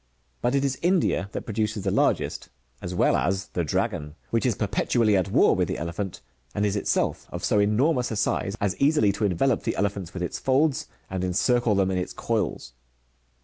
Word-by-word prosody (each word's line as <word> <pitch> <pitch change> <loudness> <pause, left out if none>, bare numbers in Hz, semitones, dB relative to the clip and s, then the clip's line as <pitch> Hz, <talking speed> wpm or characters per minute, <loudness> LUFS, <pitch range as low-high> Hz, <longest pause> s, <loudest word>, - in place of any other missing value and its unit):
'^ - - -43 0.4
But 125 +3 +1
it 140 0 +2
is 135 -1 -1
India 175 - +1
that - - -4
produces 110 -1 -2
the 95 - 0
largest,' - - 0 0.3
as 90 +1 -5
well - - +3
as 95 +7 -1
the 85 - -2
dragon,"^ 85 -2 -2 0.2
which 115 +3 +1
is 120 - +1
perpetually 110 +1 +1
at 95 0 +1
war - - +4
with, - - +1
the - - -3
elephant, 85 +3 -4 0.3
and 105 - +1
is 100 0 0
itself 100 - -1
of - - -4
so 105 - +2
enormous 120 +6 +2
a 110 - -3
size, 105 -1 -1
as 100 -2 0
easily 140 -7 +3
to 105 +2 -1
envelope 105 +6 +1
the - - -2
elephants 100 -3 -2
with 90 - -3
its 90 - -3
folds, 145 +3 +1 0.2
and 95 -1 -3
encircle 110 +5 +2
them 95 -1 +2
in 90 - 0
its 90 - -4
coils. 90 - -2
100 Hz, 200 wpm, -25 LUFS, 95-120 Hz, 0.4 s, war